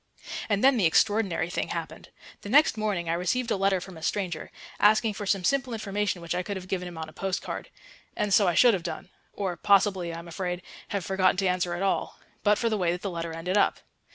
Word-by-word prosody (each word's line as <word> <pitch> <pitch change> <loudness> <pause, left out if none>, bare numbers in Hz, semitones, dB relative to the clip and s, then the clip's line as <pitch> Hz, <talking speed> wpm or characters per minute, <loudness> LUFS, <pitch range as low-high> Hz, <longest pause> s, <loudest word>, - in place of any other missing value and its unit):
And 205 +1 +1
then 270 -1 +6
the 190 -6 +4
extraordinary 195 -2 +2
thing - - -2
happened. - - -6 0.3
The 205 - -8
next 290 +3 +5
morning 205 -6 -1
I 165 - +1
received 225 +8 -1
a - - +3
letter 195 -1 +2
from 180 -1 -10
a - - -11
stranger, 175 -1 -2 0.3
asking 215 +1 +4
for 205 0 -6
some 195 -1 +1
simple 260 +3 +1
information 205 -4 -2
which 170 - -2
I 180 - 0
could 195 +2 -4
have 185 0 -9
given 180 -1 -2
him 175 -2 -9
on 160 0 -5
a 155 - -13
post 195 -1 -2
card. - - -6 0.5
And 205 -1 0
so 200 -1 +5
I 175 - +2
should 240 +4 +6
have 190 - -1
done 170 +1 -6 0.2
or 190 -3 -3
possibly, 190 -2 +3
I 165 - -6
am 170 +1 -9
afraid, 180 +1 -4 0.2
have 200 -4 -3
forgotten 185 -1 +2
to 195 0 +1
answer 180 -1 0
at 180 - -3
all 195 - -1 0.2
but 210 0 +3
for 235 - 0
the 215 -2 0
way 175 -2 +2
that 175 +1 -4
the 200 - -2
letter 170 -1 -4
ended 180 +5 0
up. - - +2
190 Hz, 240 wpm, -27 LUFS, 175-205 Hz, 0.5 s, then